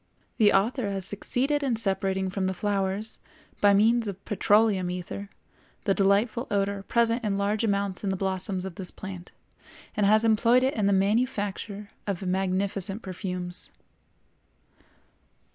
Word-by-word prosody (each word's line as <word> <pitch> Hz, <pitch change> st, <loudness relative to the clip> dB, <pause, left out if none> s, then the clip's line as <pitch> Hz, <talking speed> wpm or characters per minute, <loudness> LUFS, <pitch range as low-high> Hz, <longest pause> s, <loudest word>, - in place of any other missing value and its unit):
The 210 Hz, -2 st, +6 dB
author 220 Hz, +3 st, +1 dB
has 195 Hz, -2 st, -1 dB
succeeded 265 Hz, +9 st, 0 dB
in 265 Hz, -4 st, 0 dB
separating 190 Hz, -3 st, -1 dB
from 190 Hz, -1 st, -1 dB
the 190 Hz, -, -2 dB
flowers, 200 Hz, +1 st, -2 dB, 0.4 s
by 205 Hz, -1 st, +6 dB
means 225 Hz, +2 st, +3 dB
of 195 Hz, -1 st, -7 dB
petroleum 205 Hz, -2 st, +2 dB
ether, 180 Hz, +3 st, -5 dB, 0.5 s
the 195 Hz, -, +2 dB
delightful 205 Hz, +5 st, +2 dB
odor 200 Hz, -1 st, 0 dB
present 235 Hz, +3 st, +1 dB
in 200 Hz, -2 st, 0 dB
large 205 Hz, +2 st, 0 dB
amount 200 Hz, -3 st, -1 dB
in 200 Hz, -, 0 dB
the 190 Hz, -, 0 dB
blossoms 190 Hz, 0 st, -2 dB
of 190 Hz, -, -5 dB
this 180 Hz, -, 0 dB
plant, 185 Hz, -2 st, -9 dB, 0.6 s
and 205 Hz, -1 st, +2 dB
has 215 Hz, +2 st, +5 dB
employed 230 Hz, +3 st, +4 dB
it 265 Hz, +2 st, +2 dB
in 210 Hz, -3 st, 0 dB
the -, -, +3 dB
manufacture 205 Hz, 0 st, -1 dB, 0.2 s
of 195 Hz, -1 st, -3 dB
magnificent 195 Hz, +2 st, -1 dB
perfumes. 180 Hz, -1 st, -5 dB
200 Hz, 145 wpm, -27 LUFS, 190-220 Hz, 0.6 s, The